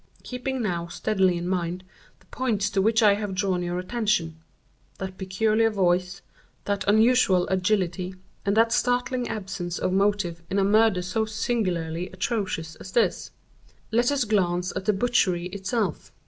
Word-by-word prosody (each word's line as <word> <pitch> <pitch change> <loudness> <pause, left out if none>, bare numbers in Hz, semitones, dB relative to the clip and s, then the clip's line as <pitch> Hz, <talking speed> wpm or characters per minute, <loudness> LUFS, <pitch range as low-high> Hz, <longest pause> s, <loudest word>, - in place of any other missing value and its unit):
"Keeping 250 0 -3
now 170 -4 -2
steadily 185 0 +1
in 170 +1 -4
mind 180 0 -2 0.4
the - - -24
points 215 -5 -1
to 195 - +1
which 225 +3 +3
I 205 -1 +7
have 205 -2 -3
drawn 185 -2 0
your 175 0 -2
attention—that 185 -2 -4
peculiar 215 +4 +2
voice, 180 -2 0 0.4
that 200 -1 -1
unusual 220 -4 +4
agility, 185 -1 0 0.3
and 200 +1 0
that 230 0 +4
startling 250 0 0
absence 195 -5 -4
of 185 - -1
motive 195 -4 +1
in 195 - -1
a 195 - +3
murder 210 -2 +3
so 200 +5 -1
singularly 185 -6 -2
atrocious 185 -5 -3
as 185 - -11
this—let 240 +1 -2
us 285 -3 +1
glance 180 -4 0
at 190 - -4
the 210 - +3
butchery 195 -5 +1
itself. 200 - -3
195 Hz, 145 wpm, -25 LUFS, 180-220 Hz, 0.4 s, I